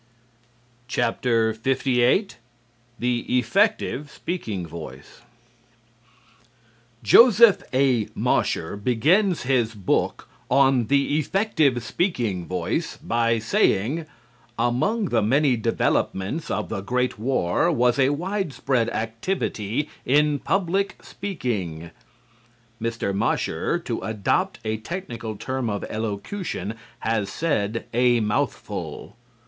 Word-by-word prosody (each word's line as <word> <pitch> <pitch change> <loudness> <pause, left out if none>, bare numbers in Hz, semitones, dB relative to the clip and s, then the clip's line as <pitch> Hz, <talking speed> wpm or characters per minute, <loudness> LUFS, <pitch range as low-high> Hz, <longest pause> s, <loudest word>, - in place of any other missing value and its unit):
LVIII 125 - +1 0.7
"THE 120 -1 0
EFFECTIVE 150 - +1
SPEAKING 110 - -4
VOICE" 80 -5 -10 1.8
Joseph 230 -3 +7
A. 130 -5 +2
Mosher 80 - 0
begins 155 - +2
his 120 -3 +1
book 100 -3 -1 0.2
on 135 -3 +4
"The 140 +2 +2
Effective 155 - +1
Speaking 115 - -1
Voice" 90 - -2
by 115 0 +1
saying: 115 +7 +1 0.5
"Among 135 - +1
the 115 -2 +2
many 130 +5 +3
developments 115 - -1
of 105 - -2
the 100 - -3
great 125 +2 -1
war 125 - +1
was 125 -3 +2
a 135 0 +4
widespread 145 - -1
activity 115 - -2 0.2
in 145 +2 +3
public 195 +3 0
speaking." 100 - -4 0.9
Mr. 115 -3 -2
Mosher, 100 - 0
to - - -4
adopt 110 -3 -1
a 110 0 -1
technical 115 - -6
term 130 +2 -3
of 100 -1 -3
elocution, 110 - -4 0.3
has 110 -3 0
said 115 -5 -1
a 120 0 +4
mouthful. 105 - -3
120 Hz, 95 wpm, -24 LUFS, 110-150 Hz, 1.8 s, Joseph